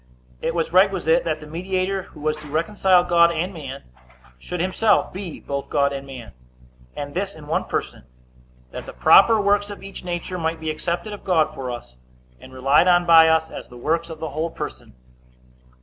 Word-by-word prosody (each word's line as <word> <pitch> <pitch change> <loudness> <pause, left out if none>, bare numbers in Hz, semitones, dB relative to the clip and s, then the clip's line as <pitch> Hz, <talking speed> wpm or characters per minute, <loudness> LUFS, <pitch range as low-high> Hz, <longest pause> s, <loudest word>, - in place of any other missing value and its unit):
A. - - -2
It 165 - -2
was 165 0 -1
requisite 185 -3 +3
that 155 -1 -2
the - - -9
mediator, 185 +4 -2
who 155 -4 -15
was 155 0 0
to 150 0 -11
reconcile 180 +4 +2
God 170 -1 +4
and 170 +4 -2
man, 140 -5 -8 0.6
should 180 - -6
himself 190 +4 +1
be 185 -3 -7
both 140 0 -5
God 140 -1 +1
and 140 0 -6
man, 130 -4 -9 0.6
and 145 0 -6
this 195 +2 -3
in 155 -2 -12
one 155 - -1
person, - - -4 0.7
that - - -8
the - - -8
proper 225 -2 +6
works 205 0 +2
of 205 - -9
each 195 -1 -9
nature 180 +1 -4
might 160 0 -2
be 160 -1 -2
accepted 175 +7 -3
of 205 - -9
God 160 -4 +2
for 135 -4 -6
us, 120 - -8 0.4
and - - -14
relied 135 +6 +3
on 175 -1 +4
by 165 -1 +7
us, 160 0 +2
as - - -9
the 125 - -12
works 165 +6 -1
of 160 -1 -8
the 160 - -4
whole 155 +4 -3
person. 115 - -8
165 Hz, 195 wpm, -22 LUFS, 150-185 Hz, 0.7 s, by